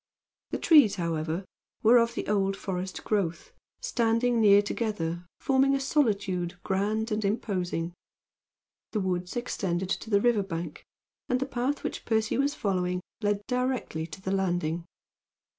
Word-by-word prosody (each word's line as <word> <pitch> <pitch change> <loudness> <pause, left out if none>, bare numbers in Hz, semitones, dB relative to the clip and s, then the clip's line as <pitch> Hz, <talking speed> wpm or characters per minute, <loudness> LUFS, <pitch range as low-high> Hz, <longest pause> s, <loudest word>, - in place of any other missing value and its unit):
The - - -2
trees, 290 - +6
however, 165 +1 -2 0.4
were 235 +2 +7
of 230 0 +1
the - - -3
old 195 -1 +1
forest 185 -1 -4
growth, 180 -6 -1 0.3
standing 230 0 +2
near 205 -1 +7
together, 180 -6 -2
forming 270 0 +3
a - - 0
solitude 200 - 0
grand 215 +4 0
and 215 0 0
imposing. 185 -5 -1 1.0
The 215 - +1
woods 180 0 -2
extended 190 -6 -2
to 220 - -2
the 200 -2 +4
river's 210 -3 +2
bank, 165 -3 -5 0.4
and 250 0 +2
the 270 - 0
path 265 +2 -2
which - - -4
Percy 220 -1 +1
was 285 +1 +1
following 180 -3 0 0.2
led 205 -1 0
directly 250 -11 -1
to 160 +2 -9
the 190 0 -3
landing. 175 -3 0
200 Hz, 140 wpm, -28 LUFS, 180-230 Hz, 1.0 s, were